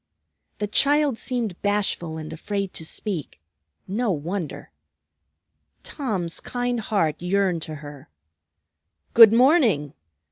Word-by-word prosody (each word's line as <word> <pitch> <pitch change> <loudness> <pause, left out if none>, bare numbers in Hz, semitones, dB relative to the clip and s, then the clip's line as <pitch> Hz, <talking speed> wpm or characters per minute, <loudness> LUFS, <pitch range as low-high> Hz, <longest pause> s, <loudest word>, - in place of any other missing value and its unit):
The 210 - -2
child 285 +4 +2
seemed 235 -8 -3
bashful 200 -5 -1
and 155 0 -7
afraid 200 +3 -4
to - - -7
speak; 165 - -5 0.5
no 220 +4 -1
wonder! 170 0 -4 1.1
Tom's 195 - -3
kind 245 -1 -2
heart 170 -9 -1
yearned 180 -1 +1
to 155 0 -6
her. 145 -6 -11 1.0
"Good 225 -2 +10
morning! 230 - +3
200 Hz, 105 wpm, -24 LUFS, 165-230 Hz, 1.1 s, Good